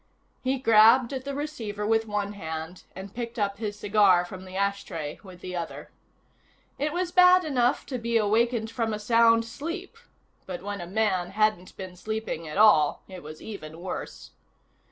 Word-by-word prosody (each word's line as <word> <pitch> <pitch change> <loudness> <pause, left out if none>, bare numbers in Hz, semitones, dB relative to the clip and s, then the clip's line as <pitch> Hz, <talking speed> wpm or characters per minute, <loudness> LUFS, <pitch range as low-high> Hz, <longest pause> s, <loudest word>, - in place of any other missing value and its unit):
He 260 +1 +1
grabbed 230 +1 +5
at 260 -1 -5
the 280 0 -4
receiver 225 -9 -4
with 225 +1 +2
one 205 -1 -2
hand, 160 -1 -6
and 195 +1 -8
picked 235 -1 -5
up 200 -2 -1
his 210 -2 -4
cigar 200 -4 +4
from 185 +1 -9
the 185 0 -10
ashtray 195 -6 -3
with 185 -3 -13
the 180 0 -6
other. 170 -1 -6 0.9
It 300 +2 0
was 350 +1 -2
bad 360 0 +6
enough 255 -3 +1
to 255 -3 -4
be 235 0 +1
awakened 225 +1 +1
from 230 -3 -1
a - - -6
sound 230 +1 +4
sleep 335 - -6 0.5
but 180 -1 -6
when 205 -1 -4
a 175 - -7
man 190 -3 0
hadn't 210 -2 0
been 185 -2 -8
sleeping 215 -4 -4
at 150 - -6
all, 180 -9 +5
it 185 -2 -9
was 155 +1 -10
even 165 -7 -8
worse. 180 +1 -7
210 Hz, 175 wpm, -26 LUFS, 185-235 Hz, 0.9 s, bad